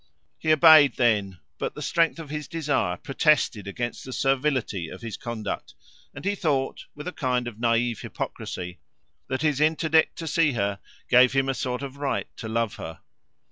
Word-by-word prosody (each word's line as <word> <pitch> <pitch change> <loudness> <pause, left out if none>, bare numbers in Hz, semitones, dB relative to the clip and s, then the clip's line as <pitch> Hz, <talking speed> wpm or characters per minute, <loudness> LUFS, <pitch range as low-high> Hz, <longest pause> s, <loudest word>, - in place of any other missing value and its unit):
He 155 - +1
obeyed 155 -3 +7
then, 105 -6 +1 0.2
but - - -3
the - - -7
strength 165 0 +2
of 160 -3 -8
his 150 -2 -4
desire 145 - -1
protested 135 - +1
against 120 +4 -4
the 130 - -8
servility 130 - 0
of 95 - -10
his 115 -2 -5
conduct; 115 -3 -5 0.4
and - - -8
he 200 - +2
thought, 145 -8 -1
with 150 +2 -8
a - - -2
kind 125 -6 -1
of 110 -2 -8
naive 115 -1 +1
hypocrisy, 90 0 -6 0.5
that 130 +3 -2
his 150 -2 +1
interdict 160 0 +3
to 165 - -5
see 155 -1 +2
her 100 -3 -1 0.3
gave 125 +1 +6
him 135 0 +2
a 135 - +1
sort 125 +1 -3
of 140 0 -7
right 140 -1 -1
to 110 - -6
love 115 -1 -1
her. 80 - -8
130 Hz, 180 wpm, -25 LUFS, 115-150 Hz, 0.5 s, obeyed